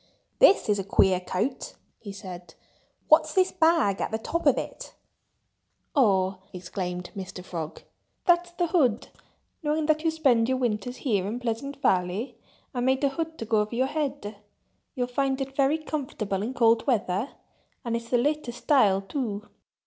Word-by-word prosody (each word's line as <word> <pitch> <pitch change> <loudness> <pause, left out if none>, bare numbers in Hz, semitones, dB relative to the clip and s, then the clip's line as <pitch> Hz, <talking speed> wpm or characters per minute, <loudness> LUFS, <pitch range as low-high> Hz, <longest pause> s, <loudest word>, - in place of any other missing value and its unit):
"This 450 -5 +6
is 205 -1 +2
a - - -2
queer 190 -1 +3
coat!" 185 +8 -3 0.2
he 205 - -8
said. 180 -4 -10 0.5
"What's - - +4
this 375 -1 +3
bag 320 - +2
at - - -1
the 220 - -1
top 335 +9 -2
of - - +5
it?" - - -6 1.0
"Oh!" 195 -7 +3
exclaimed 180 0 -5
Mr. 185 -2 -7
Frog. 165 -4 -6 0.4
"That's 350 0 +3
the 350 0 0
hood! 275 - +1 0.5
Knowing 305 0 0
that 310 0 +2
you 325 - +3
spend 260 -8 +2
your 260 - +1
winters 245 0 -2
here 200 -7 +1
in 230 +4 -3
Pleasant 250 +4 -4
Valley, 190 +7 +1 0.4
I 250 - -3
made 260 +2 +1
a 280 - +4
hood 320 +3 -4
to 225 - -5
go 220 0 +2
over 210 +2 -2
your 255 +2 +2
head.... 275 -7 -3 0.6
You'll 250 -2 0
find 265 +2 -1
it 270 0 -5
very 280 +2 +3
comfortable 260 -11 -3
in 240 +5 -4
cold 230 +1 +3
weather—and 230 +2 -3
it's 230 0 -5
the 245 - +3
latest 270 -2 -1
style, 205 -10 +4
too. 210 -3 -4
245 Hz, 165 wpm, -26 LUFS, 200-285 Hz, 1.0 s, This